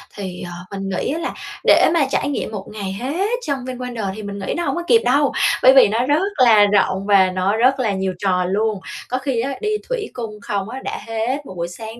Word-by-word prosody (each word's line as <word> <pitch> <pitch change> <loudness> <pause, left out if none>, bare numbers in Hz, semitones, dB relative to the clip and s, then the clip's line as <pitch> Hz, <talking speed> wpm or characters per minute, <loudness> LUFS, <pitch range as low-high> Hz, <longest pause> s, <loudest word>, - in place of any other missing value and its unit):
thì, 185 -3 -6
ờ, 175 - -8 0.3
mình 195 0 -4
nghĩ 190 +8 -2
á 325 - -3
là 340 - -3 0.3
để - - +5
mà 325 -5 +3
trải 285 - 0
nghiệm 280 - -3
một 200 -3 -6
ngày 200 -3 -5
hết 285 - -2 0.2
trong 280 -2 -1
Vinwonders 245 -6 -4
thì 215 - -7
mình 200 0 -6
nghĩ - - 0
nó 345 - -1
hổng - - -1
có 345 - -3
kịp 455 +2 +5
đâu. 280 +2 +3 0.3
Bởi 260 - +8
vì 265 - +8
nó 225 +4 0
rất 310 +9 +2
là 220 -4 +7
rộng 195 -1 +1
và 195 -2 +5
nó 185 +3 0
rất 260 +3 +3
là 225 -5 +1
nhiều 190 -1 -2
trò 180 -2 +1
luôn. 210 +2 0 0.3
Có 255 - 0
khi 260 -2 -2
á 275 +3 -2
đi 425 - -1 0.2
thủy 475 -4 -2
cung 225 -3 -6
không 205 -4 -3
á 255 +3 -6
đã - - -4
hết 235 +6 -2
một - - -9
buổi 170 0 -2
sáng 220 +6 -9
225 Hz, 245 wpm, -20 LUFS, 195-270 Hz, 0.3 s, Bởi